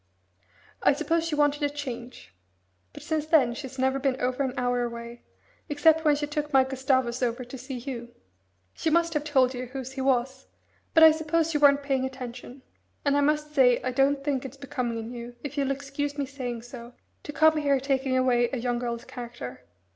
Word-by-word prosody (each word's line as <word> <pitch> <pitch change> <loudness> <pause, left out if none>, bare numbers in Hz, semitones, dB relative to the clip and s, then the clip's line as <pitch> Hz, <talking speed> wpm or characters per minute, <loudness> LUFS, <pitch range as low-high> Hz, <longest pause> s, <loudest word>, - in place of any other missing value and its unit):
I - - +5
suppose 325 +3 0
she 315 - -1
wanted 295 0 +2
a 290 - +2
change. 250 - -7 0.6
But - - -11
since 310 -1 -2
then 275 -7 +4
she's 265 +1 -8
never 265 +1 +1
been 265 -1 0
over 255 +2 -1
an 260 -2 -1
hour 245 0 +1
away, 235 0 -6 0.5
except 320 +2 +4
when 300 -2 +4
she 295 +1 -2
took 295 0 -3
my 265 -2 +6
Gustavus 260 -2 0
over 245 0 -1
to 245 - -9
see 260 +1 -7
you. 240 -1 -6 0.6
She 320 - -1
must 335 +1 +2
have 300 -2 0
told 265 -4 +2
you 250 0 -5
whose 260 0 -6
he 265 0 -5
was 260 0 0 0.5
but 320 - +8
I 320 - +10
suppose 320 +1 0
you 295 - +1
weren't 285 -1 +5
paying 270 -2 0
attention. 255 0 -7 0.4
And 285 0 +3
I 285 - +3
must 300 +1 0
say 250 -4 +5
I 255 - -1
don't 275 +2 +2
think 275 -3 -1
it's 270 +1 -8
becoming 250 -4 -3
in 225 +1 -6
you, 240 0 -8
if 290 -1 -6
you'll 280 -2 0
excuse 280 +1 -3
me 285 - -1
saying 250 -4 -5
so, 245 0 -10 0.3
to - - -7
come 315 +1 +4
here 285 -2 +2
taking 265 -1 0
away 245 -2 +3
a 265 - -2
young 240 0 -1
girl's 235 -1 -4
character. 130 - -8
265 Hz, 200 wpm, -27 LUFS, 245-290 Hz, 0.6 s, I